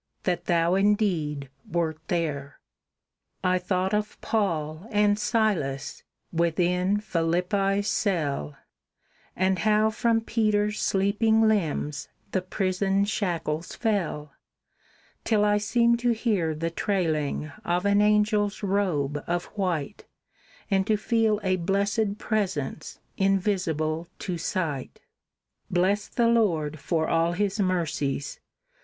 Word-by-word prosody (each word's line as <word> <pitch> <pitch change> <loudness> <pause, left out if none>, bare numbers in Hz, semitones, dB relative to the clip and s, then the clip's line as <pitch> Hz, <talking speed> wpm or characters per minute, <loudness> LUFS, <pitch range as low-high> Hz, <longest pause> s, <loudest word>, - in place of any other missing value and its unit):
that 180 -2 -1
Thou 170 0 +2
indeed 185 -8 +1 0.2
wert 160 -2 -1
there! 145 -5 -2 0.8
I 185 0 +2
thought 185 +1 -1
of 210 0 -1
Paul 165 -4 -1
and 205 -1 +2
Silas, 205 - 0 0.3
within 180 +4 +1
Philippi's 195 +2 0
cell, 150 - -1 0.8
And 185 0 +1
how 215 +1 +3
from 230 0 +1
Peter's 215 -2 0
sleeping 220 +3 +3
limbs 150 -7 -1 0.2
the 190 - 0
prison 195 +1 0
shackles 175 -6 -2
fell, 175 - -1 0.9
Till 210 -2 +2
I 210 0 +3
seemed 235 +3 +2
to 240 0 +2
hear 205 -9 0
the 165 +2 -2
trailing 160 -6 -1
of 175 +2 0
an 200 0 +4
angel's 210 0 +2
robe 160 -8 0
of 175 0 -1
white, 180 -3 -2 0.7
And 195 0 +2
to 215 -2 +3
feel 220 -1 +1
a 185 -1 +1
blessed 200 +3 0
presence 190 -13 -2 0.2
invisible 180 -5 0
to 180 -3 -4
sight. 160 -6 -3 0.7
Bless 190 +4 +1
the 235 -2 +1
Lord 165 -10 +1
for 160 +2 0
all 165 +1 +2
his 200 +2 -1
mercies! 160 -7 -1
190 Hz, 110 wpm, -26 LUFS, 165-210 Hz, 0.9 s, an